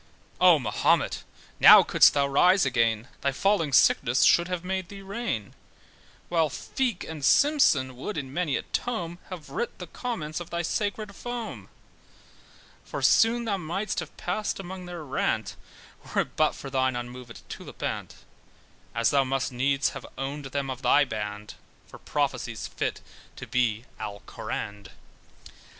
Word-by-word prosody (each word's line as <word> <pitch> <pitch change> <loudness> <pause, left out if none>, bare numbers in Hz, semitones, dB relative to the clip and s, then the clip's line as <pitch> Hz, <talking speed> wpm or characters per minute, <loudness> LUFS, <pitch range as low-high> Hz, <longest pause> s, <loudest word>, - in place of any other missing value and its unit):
Oh 180 -3 +7
Mahomet! 110 -7 +1 0.4
now - - +10
couldst - - +5
thou 140 -1 +3
rise 180 +6 +4
again, 115 -2 +1
Thy 140 - +1
falling 170 0 +1
sickness 125 -1 +4
should 170 0 +5
have 180 -1 -3
made 190 -1 -3
thee 195 -1 -10
reign, 195 - -4 0.7
While 165 -3 +2
Feake 235 - -2
and 160 -3 -7
Simpson 140 - +4
would 160 +11 -5
in 135 -3 -5
many 165 -4 0
a - - -5
tome, 175 -8 -3
Have 175 -5 -9
writ 475 0 -3
the - - -7
comments 170 -12 -4
of 175 -1 -8
thy 170 0 -2
sacred 205 +2 -2
foam: 240 -2 -6 1.1
For - - -6
soon 235 +1 +4
thou 205 -3 0
mightst 190 +4 -3
have - - -8
passed 210 +4 -2
among 185 -1 -7
their 175 -2 -7
rant 135 -2 -1 0.6
Were't - - 0
but - - +2
for 135 - -8
thine 130 -1 +1
unmovèd 120 0 -8
tulipant; - - -6 0.8
As 115 -1 +2
thou 140 -1 +4
must 135 0 -1
needs 135 +3 +1
have - - -9
owned 140 +2 -4
them 135 0 -3
of 130 0 -6
thy 145 0 +4
band 105 -3 -5 0.3
For - - -13
prophecies - - -2
fit - - -3 0.3
to - - -8
be 120 -2 0
Alcoraned. 100 0 -6
150 Hz, 145 wpm, -27 LUFS, 130-190 Hz, 1.1 s, now